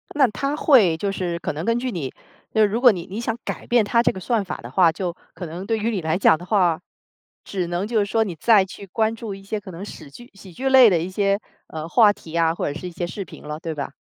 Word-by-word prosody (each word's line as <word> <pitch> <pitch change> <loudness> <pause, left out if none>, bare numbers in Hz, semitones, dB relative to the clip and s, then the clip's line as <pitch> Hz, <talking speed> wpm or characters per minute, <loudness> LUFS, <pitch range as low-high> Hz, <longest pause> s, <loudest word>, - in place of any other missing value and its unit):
那 280 -3 +5
它 275 +7 -2
会 225 - +4
就 195 +4 -2
是 175 -3 -3
可 155 - -3
能 155 +3 -5
根 230 0 +2
据 250 +1 -2
你 150 - -4 0.4
就 220 - +3
是 210 - +6
如 225 +4 -2
果 250 - +8
你 175 -5 -5
你 205 +5 -4
想 230 -1 -2
改 - - -6
变 240 -2 +4
它 235 +3 +3
这 - - +2
个 190 - -8
算 220 +1 0
法 180 - -5
的 120 - -10
话， 170 +2 +4
就 175 0 -4 0.2
可 180 - -7
能 175 +4 -7
对 225 +1 0
于 220 +2 -1
你 200 -5 -2
来 160 +2 0
讲 160 - +5
的 175 - -11
话， 180 -5 +2 0.6
只 185 -3 -3
能 175 +3 -2
就 225 -2 +1
是 200 - +2
说 225 +2 +1
你 180 -6 -5
再 205 +3 +4
去 195 +1 -11
关 220 +3 0
注 220 -3 -6
一 195 - -13
些 210 +2 -3
可 190 -2 -11
能 175 +2 -8
屎 155 -7 -10
剧 240 - -14
喜 195 -1 -14
剧 260 +10 -4
类 260 -3 +8
的 180 - +2
一 165 +3 -3
些， 200 +1 +1 0.3
呃， 155 0 -6
话 210 +3 +5
题 165 -4 -10
啊， 165 -1 +3
或 - - -2
者 145 - -6
是 180 - -6
一 - - -7
些 175 +1 -4
视 195 +3 -5
频 165 - -13
了， 150 +1 -6
对 160 -1 -4
吧？ 140 -2 -4
195 Hz, 310 characters per minute, -22 LUFS, 170-225 Hz, 0.6 s, 果